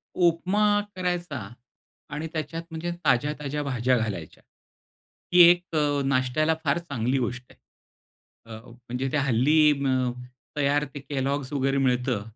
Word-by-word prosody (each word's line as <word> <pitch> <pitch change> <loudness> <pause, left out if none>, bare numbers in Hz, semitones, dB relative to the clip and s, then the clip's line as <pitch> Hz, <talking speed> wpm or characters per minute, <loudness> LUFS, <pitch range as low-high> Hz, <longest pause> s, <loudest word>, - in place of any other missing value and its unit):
उपमा 180 +4 +2 0.3
करायचा 175 -5 -2 0.8
आणि 150 +2 -4
त्याच्यात 165 +1 -4
म्हणजे 165 +2 -4
ताज्या-ताज्या 145 +2 0
भाज्या 125 -2 +1
घालायच्या. 100 -8 -5 0.9
ही 180 - +7
एक 175 -1 0
अ, 145 -2 +1
नाष्ट्याला 135 +4 +1
फार 140 +1 +2
चांगली 135 -6 -2
गोष्ट 125 0 -3
आहे. - - -26 1.0
अ, 110 - -9
म्हणजे 125 +2 -5
ते - - 0
हल्ली 145 +3 +4
अ, 130 -1 +1 0.5
तयार 145 +1 +2
ते 145 - -6
Kellogg's 140 0 -2
वगैरे 135 -1 0
मिळतं 125 -3 0
140 Hz, 125 wpm, -26 LUFS, 130-155 Hz, 1.0 s, ही